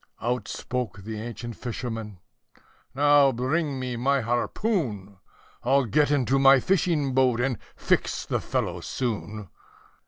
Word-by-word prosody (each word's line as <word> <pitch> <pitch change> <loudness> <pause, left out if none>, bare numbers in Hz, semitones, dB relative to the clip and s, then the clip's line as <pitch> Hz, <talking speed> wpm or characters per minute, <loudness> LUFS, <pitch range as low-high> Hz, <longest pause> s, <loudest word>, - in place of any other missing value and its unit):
Out 125 +2 -2
spoke 120 -5 -4
the 110 +1 -5
ancient 120 0 -6
fisherman, 115 -4 -5 0.8
"Now 145 -1 +5
bring 135 +3 -1
me 125 -2 -3
my 135 +3 +2
harpoon! 120 - -1 0.5
I'll 135 +2 +3
get 145 +7 +2
into 135 -2 +2
my 135 0 +7
fishing 160 -5 +1
boat, 130 -2 +3
and 125 -3 0 0.2
fix - - 0
the - - -1
fellow - - -2
soon." 105 -5 -4
125 Hz, 125 wpm, -26 LUFS, 115-140 Hz, 0.8 s, my